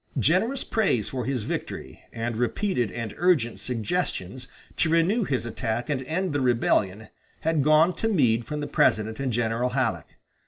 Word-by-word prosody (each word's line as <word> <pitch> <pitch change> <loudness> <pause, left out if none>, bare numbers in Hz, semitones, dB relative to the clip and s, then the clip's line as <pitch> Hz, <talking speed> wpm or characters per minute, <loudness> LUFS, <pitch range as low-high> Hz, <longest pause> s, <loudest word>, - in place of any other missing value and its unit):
Generous 190 - +2
praise 195 - +1
for 125 -2 -3
his 130 -4 -1
victory, - - -5
and 115 0 -3
repeated 120 - 0
and 115 -3 -5
urgent 165 -10 +2
suggestions 125 - -3 0.3
to 165 - +2
renew 175 +7 +2
his 125 -7 -1
attack 115 +3 -3
and 135 -3 -1
end 175 +3 -1
the 145 - 0
rebellion, 110 -4 +1 0.3
had 160 -2 +1
gone 155 +4 +5
to 225 - 0
Meade 125 - +2
from 150 +5 -4
the 145 - -3
President 110 +2 +1
and 135 -2 -1
General 115 +2 0
Halleck. 115 - -2
130 Hz, 160 wpm, -26 LUFS, 115-165 Hz, 0.3 s, gone